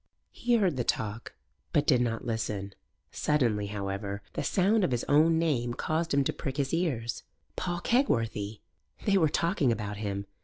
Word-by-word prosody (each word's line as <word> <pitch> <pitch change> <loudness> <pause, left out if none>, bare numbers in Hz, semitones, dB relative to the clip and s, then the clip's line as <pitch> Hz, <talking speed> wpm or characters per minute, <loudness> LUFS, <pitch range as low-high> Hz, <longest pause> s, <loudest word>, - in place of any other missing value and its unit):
He 240 0 +1
heard 190 - +2
the 125 - +1
talk, 110 -1 -2 0.4
but 145 - +3
did 125 -5 +4
not 115 -2 -1
listen. 105 -4 -3 0.4
Suddenly, 115 -9 +1
however, 100 0 -4
the - - -2
sound 200 +3 +3
of - - +2
his 120 -2 -1
own 160 +3 +4
name 125 -8 0
caused 160 +1 -1
him 140 0 +3
to - - -1
prick 135 0 -5
his 140 0 -1
ears. 135 -10 -1 0.3
Paul 175 -1 -2
Kegworthy! 115 - 0 0.4
They 195 -2 +4
were 160 -3 +4
talking 160 -4 +1
about 105 -2 -3
him. 100 -1 -3
125 Hz, 165 wpm, -29 LUFS, 105-165 Hz, 0.4 s, did